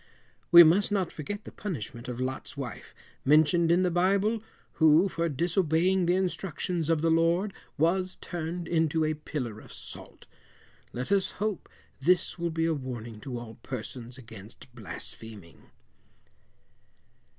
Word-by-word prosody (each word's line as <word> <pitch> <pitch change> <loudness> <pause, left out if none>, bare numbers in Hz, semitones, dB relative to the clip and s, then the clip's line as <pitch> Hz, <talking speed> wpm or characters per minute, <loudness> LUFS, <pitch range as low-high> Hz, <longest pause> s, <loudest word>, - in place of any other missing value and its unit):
We 175 -1 +12
must 185 +6 +4
not 190 -4 0
forget 205 +8 -6
the - - -10
punishment 120 - -6
of 125 -1 -5
Lot's 130 +2 -4
wife, 125 -5 -7 0.3
mentioned 155 +4 +4
in 175 +2 +4
the 180 - +1
bible, 200 +5 +2 0.4
who, 160 +4 +6
for 170 -2 -1
disobeying 175 +3 +1
the 175 - +3
instructions 180 -3 -2
of 165 -2 +2
the 165 0 +2
Lord, 170 +5 +2 0.2
was 185 +4 +3
turned 170 0 -5
into 160 -1 +1
a 155 - +1
pillar 135 -7 -5
of - - -14
salt. - - -8 0.7
Let 125 +7 -5
us 195 -1 +2
hope 210 -1 -3 0.3
this 175 +5 +2
will 170 0 0
be 165 0 0
a 165 - +2
warning 120 -6 -6
to 125 +2 -6
all 115 -2 -9
persons 125 0 -7
against 110 -5 -13
blaspheming. 105 -7 -8
165 Hz, 140 wpm, -28 LUFS, 130-180 Hz, 0.7 s, We